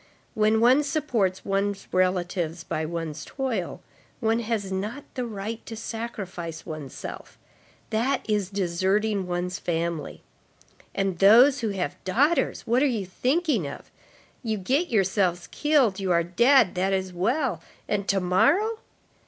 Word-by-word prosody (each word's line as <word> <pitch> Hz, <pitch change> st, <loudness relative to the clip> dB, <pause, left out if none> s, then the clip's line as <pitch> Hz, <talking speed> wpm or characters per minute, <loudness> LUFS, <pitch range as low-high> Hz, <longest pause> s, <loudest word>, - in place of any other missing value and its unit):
When 215 Hz, +1 st, +3 dB
one 250 Hz, +5 st, +5 dB
supports 250 Hz, -11 st, -1 dB
one's 200 Hz, 0 st, -1 dB
relatives 180 Hz, -2 st, 0 dB
by 155 Hz, -1 st, -3 dB
one's 160 Hz, -2 st, -4 dB
toil, 245 Hz, -10 st, -3 dB, 0.4 s
one 225 Hz, -1 st, +1 dB
has 215 Hz, -4 st, -2 dB
not 210 Hz, +9 st, -3 dB
the 250 Hz, -2 st, -3 dB
right 220 Hz, +1 st, -5 dB
to 225 Hz, -, -6 dB
sacrifice 200 Hz, -8 st, -6 dB
one's 155 Hz, -5 st, -7 dB
self. -, -, -8 dB, 0.5 s
That 250 Hz, +5 st, 0 dB
is 205 Hz, -4 st, 0 dB
deserting 195 Hz, +2 st, 0 dB
one's 180 Hz, 0 st, -2 dB
family. 170 Hz, -1 st, -3 dB, 0.7 s
And 195 Hz, -3 st, -1 dB
those 245 Hz, +8 st, +7 dB
who 225 Hz, -, -1 dB
have 185 Hz, -7 st, -4 dB
daughters! 280 Hz, -, +1 dB
what 240 Hz, +3 st, +2 dB
are 290 Hz, -, +4 dB
you 225 Hz, -7 st, -1 dB
thinking 255 Hz, -, 0 dB
of? 140 Hz, -, -9 dB, 0.5 s
You 220 Hz, -3 st, -2 dB
get 270 Hz, -, 0 dB
yourselves 190 Hz, -, +1 dB
killed, 275 Hz, -10 st, +2 dB
you 190 Hz, -2 st, -1 dB
are 170 Hz, -1 st, +3 dB
dead, 235 Hz, +5 st, +4 dB
that 190 Hz, +2 st, 0 dB
is 190 Hz, -1 st, -2 dB
well. 225 Hz, -, 0 dB, 0.3 s
And 200 Hz, -1 st, -1 dB
tomorrow? 200 Hz, -, +2 dB
200 Hz, 135 wpm, -26 LUFS, 180-235 Hz, 0.7 s, those